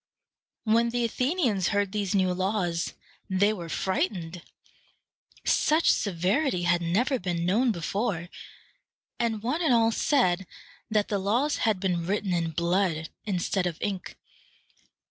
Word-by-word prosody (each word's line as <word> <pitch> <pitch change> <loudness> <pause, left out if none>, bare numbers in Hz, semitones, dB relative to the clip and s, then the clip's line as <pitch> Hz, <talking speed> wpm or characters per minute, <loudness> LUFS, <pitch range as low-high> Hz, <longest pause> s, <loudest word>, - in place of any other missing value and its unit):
When 230 +1 +3
the 240 0 0
Athenians 250 - 0
heard 200 -2 0
these 205 -2 -1
new 185 -2 +2
laws, 180 -3 -1 0.3
they 200 +3 +3
were 170 -5 -7
frightened. 175 0 -2 1.0
Such 315 +2 +3
severity 190 - 0
had 175 0 +2
never 235 - +1
been 175 -3 -2
known 230 +7 +3
before; 190 -1 -2 0.9
and 225 -3 -1
one 275 +9 -1
and 295 -8 +4
all 225 -1 +4
said 190 - +2 0.4
that 210 -2 +1
the 205 - 0
laws 240 +10 +1
had 205 -4 0
been 175 -3 -1
written 200 -1 0
in 170 -1 0
blood 170 0 0 0.2
instead 190 -2 0
of 170 -3 -4
ink. 195 -3 -4
195 Hz, 130 wpm, -27 LUFS, 175-230 Hz, 1.0 s, and